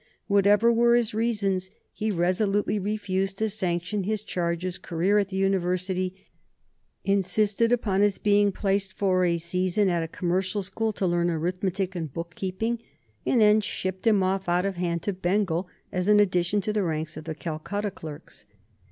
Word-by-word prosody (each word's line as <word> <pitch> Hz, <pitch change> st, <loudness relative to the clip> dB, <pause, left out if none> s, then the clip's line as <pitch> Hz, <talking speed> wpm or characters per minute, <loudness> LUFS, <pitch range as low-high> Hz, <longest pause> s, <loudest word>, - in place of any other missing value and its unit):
Whatever 205 Hz, +3 st, +4 dB
were 235 Hz, +1 st, +4 dB
his 235 Hz, -3 st, +1 dB
reasons, 200 Hz, -5 st, 0 dB, 0.2 s
he 215 Hz, 0 st, -2 dB
resolutely 200 Hz, +3 st, +1 dB
refused 195 Hz, -1 st, -2 dB
to 220 Hz, +1 st, 0 dB
sanction 185 Hz, 0 st, -1 dB
his 215 Hz, +2 st, -2 dB
charge's 175 Hz, 0 st, -2 dB
career 185 Hz, +3 st, +1 dB
at 200 Hz, -, 0 dB
the 190 Hz, -1 st, -5 dB
university, 185 Hz, -1 st, 0 dB, 0.9 s
insisted 205 Hz, +3 st, +1 dB
upon 205 Hz, -5 st, +1 dB
his 205 Hz, -1 st, +3 dB
being 205 Hz, -1 st, +3 dB
placed 195 Hz, 0 st, -1 dB
for 185 Hz, -2 st, +2 dB
a 170 Hz, -1 st, +2 dB
season 180 Hz, +4 st, +1 dB
at 170 Hz, -2 st, +1 dB
a 165 Hz, -, -3 dB
commercial 185 Hz, +4 st, -1 dB
school 220 Hz, +4 st, -2 dB
to 195 Hz, -, -2 dB
learn 175 Hz, -1 st, +1 dB
arithmetic 185 Hz, +3 st, -2 dB
and 160 Hz, -5 st, -4 dB
book 170 Hz, +3 st, -6 dB
keeping, 210 Hz, +7 st, -2 dB, 0.5 s
and 245 Hz, -, +3 dB
then 210 Hz, 0 st, +6 dB
shipped 190 Hz, 0 st, -3 dB
him 205 Hz, -4 st, +4 dB
off 190 Hz, 0 st, -1 dB
out 175 Hz, +2 st, +2 dB
of 195 Hz, -1 st, -1 dB
hand 170 Hz, -2 st, -2 dB
to 205 Hz, -, -1 dB
Bengal 185 Hz, -1 st, 0 dB, 0.2 s
as 180 Hz, +1 st, -1 dB
an 210 Hz, 0 st, +6 dB
addition 185 Hz, 0 st, +2 dB
to 210 Hz, +2 st, -2 dB
the 210 Hz, -, +1 dB
ranks 155 Hz, -3 st, -2 dB
of 155 Hz, +1 st, -8 dB
the 160 Hz, -1 st, -4 dB
Calcutta 180 Hz, +6 st, -4 dB
clerks. 150 Hz, -, -10 dB
190 Hz, 170 wpm, -26 LUFS, 175-205 Hz, 0.9 s, then